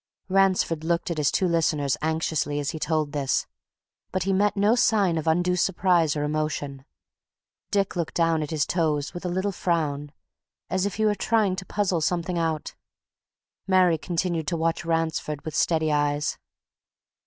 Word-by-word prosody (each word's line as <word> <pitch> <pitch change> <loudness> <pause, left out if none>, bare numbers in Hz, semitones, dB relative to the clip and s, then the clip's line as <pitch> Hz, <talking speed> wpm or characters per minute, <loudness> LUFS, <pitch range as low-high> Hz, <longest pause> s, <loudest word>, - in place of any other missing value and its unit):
Ransford 185 -4 +2
looked 170 +1 0
at 160 - -2
his 145 - +3
two 185 - +1
listeners 155 -5 +1
anxiously 155 -2 -1
as 145 0 -2
he 160 - -6
told 155 -2 0
this. 140 -3 0 0.7
But 185 -1 -1
he 195 +1 0
met 205 +1 +2
no 205 +3 +4
sign 210 -7 +3
of 160 0 -3
undue 175 +3 +2
surprise 175 -4 +2
or 145 - -1
emotion. 150 -2 -3 0.8
Dick 200 -2 0
looked 170 -3 -3
down 165 -2 +2
at 150 - -3
his 155 -2 0
toes 150 -4 0
with 175 - -7
a - - 0
little 190 +3 -1
frown, 150 -6 -1 0.6
as 185 +1 +1
if 200 - -5
he 220 - +1
were 210 - +3
trying 210 -2 +1
to 190 - -6
puzzle 195 -5 0
something 170 +2 -1
out; 160 -2 -2 0.9
Mary 185 -4 +4
continued 170 -2 -2
to 170 - -1
watch 165 +1 -1
Ransford 165 -3 -1
with 155 - -5
steady 160 0 +1
eyes. 145 0 0
165 Hz, 165 wpm, -25 LUFS, 155-185 Hz, 0.9 s, no